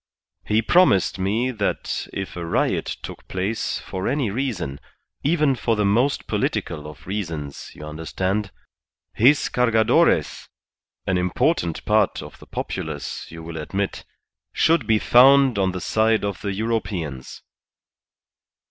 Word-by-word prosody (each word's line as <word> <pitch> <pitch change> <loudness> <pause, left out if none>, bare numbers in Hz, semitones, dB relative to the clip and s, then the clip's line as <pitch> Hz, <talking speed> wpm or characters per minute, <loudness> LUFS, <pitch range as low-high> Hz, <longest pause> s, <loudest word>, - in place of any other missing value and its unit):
He 110 +2 +2
promised 115 - +4
me 110 +7 0
that 105 -4 -2
if 95 -1 -5
a 90 - -5
riot 85 - 0
took - - -9
place 95 +4 -2
for 95 0 -5
any 130 -5 0
reason 100 - -3 0.4
even 150 -2 +3
for 120 -2 0
the 105 -1 +1
most 120 +8 +2
political 75 -2 -2
of 75 -1 -12
reasons, 85 -8 -5
you - - -9
understand 95 +6 -2 0.6
his 135 +6 +4
Cargadores, 115 -3 +2 0.6
an 90 -1 +1
important 90 - 0
part 105 -2 +2
of - - -12
the - - -15
populace, - - -5
you 80 0 -9
will 80 0 -7
admit, 95 +6 -3 0.5
should 165 +1 +2
be 110 -1 +4
found 130 0 +6
on 95 -1 +2
the 90 - -5
side 110 +2 +1
of 100 -2 -4
the 100 - -2
Europeans." 95 - -3
100 Hz, 130 wpm, -23 LUFS, 90-120 Hz, 0.6 s, found